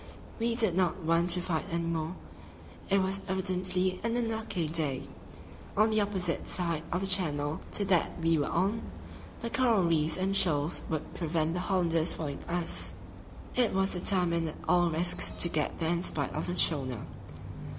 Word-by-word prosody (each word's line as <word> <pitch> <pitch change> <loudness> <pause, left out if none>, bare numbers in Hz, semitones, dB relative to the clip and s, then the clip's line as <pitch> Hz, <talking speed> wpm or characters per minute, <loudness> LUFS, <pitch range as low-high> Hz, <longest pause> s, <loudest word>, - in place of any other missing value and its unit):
We 230 0 0
did 220 -7 +3
not 180 0 0
want 165 +2 +2
to 180 +1 +2
fight 165 -3 -2
any 170 0 -2
more; 165 +1 -3 0.7
it 195 -1 +3
was 195 +1 -1
evidently 185 0 +1
an 230 0 -1
unlucky 220 -7 -2
day. 150 -5 -2 0.7
On 215 +1 +4
the 215 0 +2
opposite 190 -4 -1
side 170 -4 0
of 180 - -1
the - - -1
channel 155 -6 0
to 205 - -1
that 180 -3 +1
we 165 0 +2
were 145 -3 0
on, 195 +6 0 0.6
the 230 -1 -4
coral 240 -8 +3
reefs 160 -2 +1
and 190 +1 -1
shoals 160 -4 +3
would 155 -2 -4
prevent 165 -1 -1
the 180 - -2
Hollanders 175 -3 +2
following 145 -3 -5
us: 170 0 -1 0.6
it 245 -2 +2
was 190 0 +1
determined 175 -2 +2
at 155 - -7
all 175 -1 +3
risks 170 +2 +3
to - - +4
get 155 -3 -1
there 165 -1 0
in 170 0 0
spite 145 -5 -1
of 155 - -3
the 175 - -2
schooner. 130 -10 +2
175 Hz, 170 wpm, -29 LUFS, 160-190 Hz, 0.7 s, On